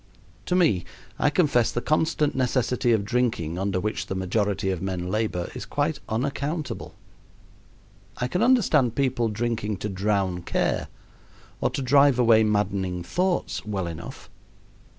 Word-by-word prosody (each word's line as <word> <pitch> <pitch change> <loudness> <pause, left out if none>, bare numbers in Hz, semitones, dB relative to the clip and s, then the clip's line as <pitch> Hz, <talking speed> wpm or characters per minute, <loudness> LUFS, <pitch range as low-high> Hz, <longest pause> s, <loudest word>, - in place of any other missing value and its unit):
To 180 - +1
me, 155 - +3 0.4
I - - +3
confess 145 -8 +2
the - - -1
constant 155 +1 +1
necessity 125 -1 +1
of 110 -3 +2
drinking 110 -8 -1
under 95 -1 0
which 105 +3 -3
the 95 - -3
majority 95 +1 0
of 90 -3 -3
men 90 -2 -3
labor 105 -5 -1
is - - -6
quite - - -1
unaccountable. 140 +6 -3 1.2
I 125 - -1
can 180 +10 -1
understand 180 - +3
people 130 -4 +1
drinking 110 -1 -2
to 105 - -4
drown 95 -2 0
care - - -1 0.7
or - - +1
to 135 - -3
drive 140 0 +5
away 115 -3 +5
maddening 100 -4 0
thoughts 180 - -1
well 100 -4 -3
enough. 85 0 -8
110 Hz, 140 wpm, -25 LUFS, 95-135 Hz, 1.2 s, drive